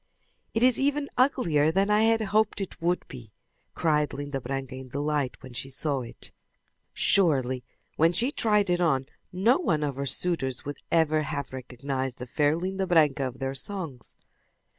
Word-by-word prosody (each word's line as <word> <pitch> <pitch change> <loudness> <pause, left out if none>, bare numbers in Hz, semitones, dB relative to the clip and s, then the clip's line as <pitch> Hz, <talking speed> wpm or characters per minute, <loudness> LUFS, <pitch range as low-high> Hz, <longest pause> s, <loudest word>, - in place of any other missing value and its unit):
"It 225 - +2
is 255 -1 +5
even 285 +1 0
uglier 170 - +3
than 195 +4 +2
I 210 +1 +4
had 225 0 +3
hoped 215 +1 +1
it 195 -3 -6
would 175 +1 0
be!" 120 -5 -11 0.4
cried 150 -2 +1
Linda 145 -1 -4
Branca 135 +1 -4
in 130 0 -8
delight 145 -1 -1
when 130 - -10
she 130 +2 -5
saw 140 +1 +1
it. 115 - -8 0.6
Surely, 130 -9 +2 0.3
when 165 +2 +4
she 240 +9 0
tried 210 -8 +2
it 175 0 +1
on 135 -6 +2 0.3
no 210 - +3
one 155 - 0
of 140 -3 -2
her 140 0 -2
suitors 135 -6 -1
would 145 0 -5
ever 155 -2 +3
have 140 -2 -4
recognized 130 0 -4
the 125 - -6
fair 145 +4 +1
Linda 190 +2 -2
Branca 150 -6 +3
of 125 -1 -8
their 135 0 -3
songs. 145 - -5
150 Hz, 170 wpm, -27 LUFS, 135-190 Hz, 0.6 s, is